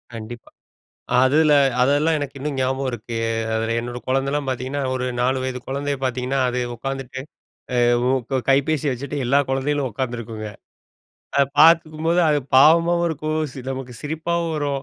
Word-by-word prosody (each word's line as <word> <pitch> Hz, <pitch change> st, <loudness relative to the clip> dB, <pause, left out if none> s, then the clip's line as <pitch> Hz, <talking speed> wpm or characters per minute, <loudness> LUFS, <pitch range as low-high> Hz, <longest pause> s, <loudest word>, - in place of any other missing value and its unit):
கண்டிப்பா. 115 Hz, +1 st, -9 dB, 0.7 s
அதுல 150 Hz, +4 st, +4 dB, 0.3 s
அதெல்லாம் 145 Hz, +5 st, +3 dB
எனக்கு 145 Hz, -1 st, -5 dB
இன்னும் 145 Hz, +1 st, -4 dB
ஞாபகம் 130 Hz, +1 st, -1 dB
இருக்கு. 115 Hz, 0 st, -5 dB, 0.4 s
அதுல 115 Hz, +1 st, -1 dB
என்னோட 120 Hz, +1 st, -6 dB
குழந்தைல்லாம் 135 Hz, +2 st, 0 dB
பார்த்தீங்கன்னா, 130 Hz, +2 st, -3 dB
ஒரு 130 Hz, -1 st, -2 dB, 0.2 s
4 130 Hz, +2 st, +1 dB
வயது 130 Hz, -1 st, -3 dB
குழந்தைய 140 Hz, +1 st, -2 dB
பார்த்தீங்கன்னா, 130 Hz, +1 st, -1 dB
அது 125 Hz, 0 st, -2 dB, 0.2 s
உட்காந்துட்டு 135 Hz, +1 st, -5 dB, 0.6 s
அ -, -, +4 dB, 0.3 s
உ -, -, +3 dB, 0.2 s
க 130 Hz, -, +2 dB
கைபேசி 140 Hz, +2 st, +2 dB
வச்சுட்டு 140 Hz, +3 st, -5 dB
எல்லா 140 Hz, +3 st, +4 dB
குழந்தைகளும் 135 Hz, +1 st, 0 dB
உட்கார்ந்திருக்குங்க. 115 Hz, -2 st, -4 dB, 0.9 s
அத 140 Hz, -, +5 dB, 0.2 s
பார்த்துக்கும்போது, 165 Hz, +1 st, +4 dB
அது 150 Hz, -1 st, +2 dB, 0.2 s
பாவமாவும் 170 Hz, +4 st, +5 dB
இருக்கும். 155 Hz, 0 st, -2 dB, 0.2 s
சில 130 Hz, -, -8 dB
நமக்கு 130 Hz, -2 st, -7 dB
சிரிப்பாவும் 165 Hz, +2 st, -2 dB
வரும். 140 Hz, -2 st, -2 dB
135 Hz, 140 wpm, -22 LUFS, 125-150 Hz, 0.9 s, அத